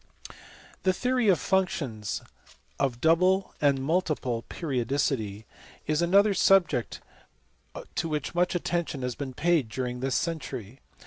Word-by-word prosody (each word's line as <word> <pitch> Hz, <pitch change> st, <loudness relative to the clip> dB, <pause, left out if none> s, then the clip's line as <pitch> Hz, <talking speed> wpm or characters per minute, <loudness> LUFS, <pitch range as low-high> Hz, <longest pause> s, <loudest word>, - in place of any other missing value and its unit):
ABEL. -, -, -16 dB
463 -, -, -20 dB
The 185 Hz, -1 st, +1 dB
theory 250 Hz, -2 st, +1 dB
of 185 Hz, -6 st, +5 dB
functions 140 Hz, -, -1 dB, 0.6 s
of 125 Hz, -3 st, -1 dB
double 185 Hz, +4 st, +3 dB
and 140 Hz, -2 st, +3 dB
multiple 150 Hz, -7 st, 0 dB
periodicity 125 Hz, -, -1 dB, 0.4 s
is 155 Hz, +2 st, +1 dB
another 200 Hz, +4 st, +4 dB
subject 185 Hz, -11 st, +3 dB, 0.9 s
to 165 Hz, -, -2 dB
which 150 Hz, -2 st, -3 dB
much 180 Hz, +1 st, +1 dB
attention 170 Hz, -6 st, -2 dB
has 125 Hz, 0 st, -1 dB
been 130 Hz, 0 st, -6 dB
paid 160 Hz, -6 st, +2 dB
during 125 Hz, +1 st, -3 dB
this 130 Hz, 0 st, -1 dB
century. 135 Hz, -, -4 dB
150 Hz, 130 wpm, -27 LUFS, 125-175 Hz, 0.9 s, of